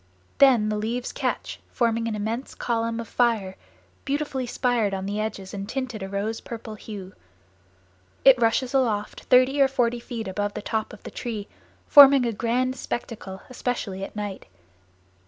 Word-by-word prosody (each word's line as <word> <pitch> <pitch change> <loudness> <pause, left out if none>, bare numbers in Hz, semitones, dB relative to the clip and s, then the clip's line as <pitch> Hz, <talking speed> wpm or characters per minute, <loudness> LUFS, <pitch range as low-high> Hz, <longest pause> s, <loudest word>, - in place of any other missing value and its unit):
Then 245 -6 +6
the 210 - -1
leaves 235 +3 -2
catch - - -3
forming 230 -1 0
an 220 - -2
immense 220 +5 -4
column 230 -1 -1
of 230 - -5
fire, 220 -6 +1 0.5
beautifully 275 -3 -2
spired 235 -5 +1
on 190 0 -4
the 205 +2 -2
edges 200 -3 -4
and 200 0 -5
tinted 250 -4 -4
a 195 - -5
rose 205 +3 -3
purple 225 -1 -7
hue. 205 -3 -9 1.1
It 260 -2 +7
rushes 240 +3 +2
aloft 225 -6 0
thirty 255 +2 +4
or 270 - +7
forty 245 -3 0
feet 230 -2 -6
above 205 +2 -2
the - - -4
top 220 0 -2
of 210 - -13
the - - -8
tree, 220 -4 -5 0.4
forming 275 -3 +8
a 230 - 0
grand 250 +3 0
spectacle, 210 -6 -6
especially 235 -6 -3
at - - -7
night. 205 -2 -5
230 Hz, 160 wpm, -25 LUFS, 210-250 Hz, 1.1 s, forming